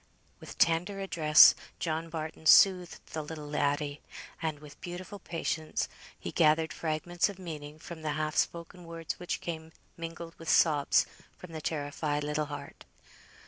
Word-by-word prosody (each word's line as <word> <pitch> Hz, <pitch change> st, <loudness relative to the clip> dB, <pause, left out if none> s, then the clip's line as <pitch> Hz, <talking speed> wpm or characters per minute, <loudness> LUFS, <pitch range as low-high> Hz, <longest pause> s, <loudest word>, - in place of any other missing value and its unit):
With -, -, -10 dB
tender 175 Hz, +4 st, +2 dB
address, 160 Hz, -5 st, +7 dB, 0.2 s
John 165 Hz, 0 st, -2 dB
Barton 160 Hz, 0 st, -5 dB
soothed 180 Hz, -1 st, +6 dB
the 155 Hz, -, -2 dB
little 150 Hz, 0 st, -7 dB
laddie, 145 Hz, 0 st, -1 dB, 0.4 s
and 160 Hz, -2 st, -1 dB
with 145 Hz, -1 st, -14 dB
beautiful 180 Hz, +3 st, -7 dB
patience 165 Hz, -3 st, -2 dB, 0.3 s
he -, -, -5 dB
gathered 160 Hz, 0 st, +3 dB
fragments 170 Hz, +3 st, 0 dB
of 200 Hz, -, -8 dB
meaning 155 Hz, -5 st, -7 dB
from 165 Hz, 0 st, -9 dB
the 155 Hz, -1 st, -1 dB
half 155 Hz, 0 st, -2 dB
spoken 170 Hz, +1 st, -2 dB
words 165 Hz, -1 st, -5 dB
which 180 Hz, -, -3 dB
came 160 Hz, -1 st, -5 dB, 0.3 s
mingled 165 Hz, 0 st, -7 dB
with 165 Hz, -, -6 dB
sobs 150 Hz, -4 st, +4 dB, 0.3 s
from 180 Hz, -, -11 dB
the 160 Hz, -1 st, -6 dB
terrified 145 Hz, -1 st, -2 dB
little 150 Hz, +1 st, -1 dB
heart. 145 Hz, -1 st, -8 dB
160 Hz, 145 wpm, -30 LUFS, 150-170 Hz, 0.4 s, address